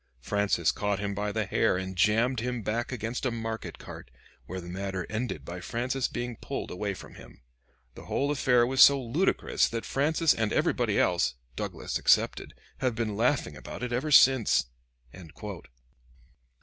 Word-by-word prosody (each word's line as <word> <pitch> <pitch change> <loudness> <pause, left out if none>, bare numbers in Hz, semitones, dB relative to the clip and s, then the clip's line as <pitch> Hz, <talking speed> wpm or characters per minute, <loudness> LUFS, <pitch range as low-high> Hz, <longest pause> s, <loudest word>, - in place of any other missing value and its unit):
Francis 100 +2 +1
caught 105 -1 -1
him 100 0 -3
by 105 +1 -2
the 110 0 -1
hair 95 - +1
and 95 0 -5
jammed 115 +6 +2
him 125 -1 -3
back 115 +5 -2
against 120 0 -4
a 130 - +1
market 115 -1 -5
cart, - - -10 0.4
where 95 +1 -5
the 85 - -9
matter 95 0 -4
ended 110 0 -3
by 90 +1 -6
Francis 125 +7 -2
being 120 0 -4
pulled - - -5
away 100 +1 -3
from - - -12
him. - - -15 0.5
The - - -12
whole 140 +1 0
affair 125 -4 +3
was 130 +2 +2
so 140 -1 +8
ludicrous 135 +10 +1
that 115 0 -4
Francis 155 +3 +2
and 110 -2 -1
everybody - - +1
else, - - +2 0.2
Douglas - - -4
excepted, - - +2 0.2
have 130 -3 0
been 110 -2 -2
laughing 115 - +1
about 65 - -8
it 125 -1 -3
ever 130 +6 -1
since." 130 - +5
115 Hz, 160 wpm, -28 LUFS, 100-125 Hz, 0.5 s, so